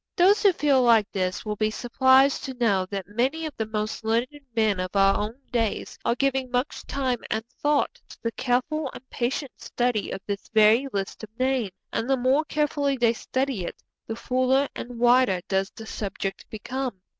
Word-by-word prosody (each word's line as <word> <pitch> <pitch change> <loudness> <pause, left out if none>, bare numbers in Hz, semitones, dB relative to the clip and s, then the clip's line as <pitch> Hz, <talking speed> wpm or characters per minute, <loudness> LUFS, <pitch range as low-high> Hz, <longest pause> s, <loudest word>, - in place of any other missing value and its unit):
Those 385 +4 +5
who 405 - +6
feel 285 -6 +3
like 230 -4 +4
this 185 +1 -2
will 210 -1 -3
be 215 +1 +1
surprised 260 +4 +3
to 265 -2 -5
know 200 -6 +1
that 195 -1 -4
many 260 +10 -1
of 310 - -5
the 220 - -3
most 215 0 -3
learned 240 +6 -1
men 215 -4 +2
of 185 +2 -4
our 195 0 +5
own 215 +5 -3
days 230 -3 -1
are 235 - +1
giving 265 0 0
much 250 +3 -2
time 260 -3 -1
and 220 +1 -2
thought 290 +4 -1
to - - -12
the 230 - 0
careful 265 +5 -1
and 260 - -11
patient 255 +2 -2
study 240 -4 -1
of - - -4
this 200 -1 -5
very 220 +5 +5
list 195 +1 -4
of 220 - -7
names; 255 -4 +1 0.2
and 235 - -1
the 270 - +3
more 260 +4 +3
carefully 290 -3 0
they 235 -2 +3
study 260 -3 -2
it, - - -5 0.3
the 225 - -3
fuller 255 +3 +1
and 245 0 -7
wider 240 -5 +4
does 195 0 0
the 220 - -11
subject 195 -2 -5
become. 245 -1 -4
245 Hz, 190 wpm, -25 LUFS, 215-265 Hz, 0.3 s, who